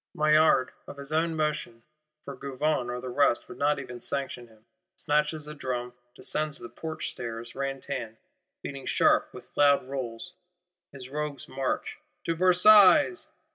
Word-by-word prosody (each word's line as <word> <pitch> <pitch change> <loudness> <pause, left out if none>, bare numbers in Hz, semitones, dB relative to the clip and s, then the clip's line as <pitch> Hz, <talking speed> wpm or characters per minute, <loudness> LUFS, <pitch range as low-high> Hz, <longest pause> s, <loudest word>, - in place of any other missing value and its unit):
Maillard, 155 -3 +4 0.2
of - - -9
his 140 +2 -7
own 165 +1 +1
motion, 150 -7 -2 0.4
for 140 - -7
Gouvion 135 -1 -1
or 125 0 -3
the 130 - -6
rest 140 -2 +2
would 185 - -11
not 145 +1 +2
even 125 -3 -8
sanction 135 -3 -4
him,—snatches 150 +5 -3
a 150 - -6
drum; 125 -4 -4 0.2
descends 150 -1 -2
the 120 - -8
Porch 160 -1 -5
stairs, 115 -1 -7
ran 135 0 -3
tan, 120 -6 -5 0.5
beating 140 -2 -7
sharp, - - +3
with - - -13
loud 140 -2 +4
rolls, 130 +4 -6 0.6
his 130 -2 -10
Rogues' 150 -1 -4
march: 135 0 -3 0.2
To 165 - 0
Versailles! 205 - +6
140 Hz, 145 wpm, -28 LUFS, 125-155 Hz, 0.6 s, Versailles